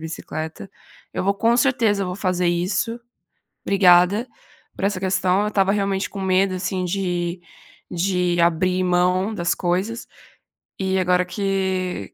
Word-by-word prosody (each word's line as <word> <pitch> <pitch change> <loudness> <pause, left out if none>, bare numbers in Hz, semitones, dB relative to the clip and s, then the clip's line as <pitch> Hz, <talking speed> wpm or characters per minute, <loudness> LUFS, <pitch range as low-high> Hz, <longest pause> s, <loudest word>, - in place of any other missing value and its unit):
bicicleta. 160 +2 -6 0.4
Eu - - -2
vou 200 0 +2
com 230 +3 +2
certeza 230 -5 +2
eu - - -4
vou 180 0 -4
fazer 180 -2 0
isso. 185 +7 -1 0.7
Obrigada 195 +3 +4 0.5
por - - -6
essa 200 -2 -1
questão, 185 0 +1
eu 210 - -1
estava 195 -1 +2
realmente 195 -1 -1
com 195 - -7
medo 190 0 +2
assim 185 0 -2
de 175 -1 -2 0.5
de 180 -1 0
abrir 180 +2 +2
mão 180 +3 +1
das 175 -4 0
coisas, 190 +6 -2 0.7
e 190 0 0
agora 180 0 +2
que 190 - -2
185 Hz, 140 wpm, -22 LUFS, 180-195 Hz, 0.7 s, Obrigada